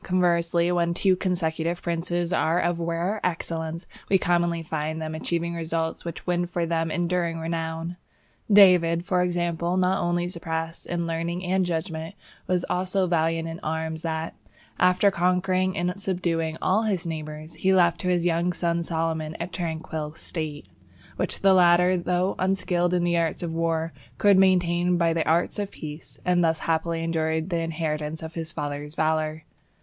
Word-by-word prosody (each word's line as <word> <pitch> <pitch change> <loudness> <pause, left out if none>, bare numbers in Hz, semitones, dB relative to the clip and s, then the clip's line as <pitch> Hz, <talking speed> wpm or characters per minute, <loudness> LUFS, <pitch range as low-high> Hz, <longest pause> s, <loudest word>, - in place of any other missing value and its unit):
Conversely, 175 -1 +2
when 170 -1 +1
two 190 0 +3
consecutive 170 -2 -1
princes 175 +1 -1
are 165 0 +2
of 175 -1 0
rare 170 +5 -1
excellence, 165 -1 -3 0.2
we 195 - +5
commonly 175 -2 +1
find 155 0 -3
them 160 0 -4
achieving 170 +1 -2
results 165 -1 -2
which 170 -2 -7
win 175 -1 0
for 175 -1 -1
them 165 -1 0
enduring 175 0 0
renown. 165 +1 -3 0.5
David, 180 -4 +6
for 180 -1 +2
example, 175 0 0
not 185 +1 +2
only 175 0 0
surpassed 165 -1 -4
in 170 -1 -2
learning 170 +2 -2
and 185 0 +1
judgment, 165 +1 -3 0.3
but 180 -1 +1
was 180 +1 -1
so 190 0 +2
valiant 165 -1 +1
in 165 +1 -6
arms 160 0 -3
that, 160 -1 -3 0.4
after 180 +2 +4
conquering 185 +1 +1
and 175 +1 0
subduing 165 -4 -1
all 190 +4 +3
his 200 -6 -1
neighbours, 155 -1 -6
he 190 - +1
left 175 -2 +4
to 180 - -3
his 175 -1 +2
young 175 +1 +1
son 170 -1 0
Solomon 160 -1 -2
a 170 - -1
tranquil 160 -3 -4
State, 155 - -5 0.5
which - - -3
the 195 -1 +6
latter, 180 0 +5
though 180 +2 0
unskilled 180 -2 +1
in 175 - +1
the 175 0 +2
arts 165 +1 -1
of 165 -1 -3
war, 165 -1 -1 0.2
could 200 +4 +5
maintain 180 -2 +3
by 170 -1 +2
the 165 -1 -1
arts 170 +5 +1
of 200 -1 -2
peace, 150 -2 -9
and 180 -1 +3
thus 160 -1 +2
happily 165 0 0
enjoy 160 -1 0
the 170 +1 -2
inheritance 155 -1 -3
of 160 +1 -7
his 165 -1 -3
father's 145 -1 -5
valour. 155 0 0
170 Hz, 165 wpm, -25 LUFS, 160-180 Hz, 0.5 s, David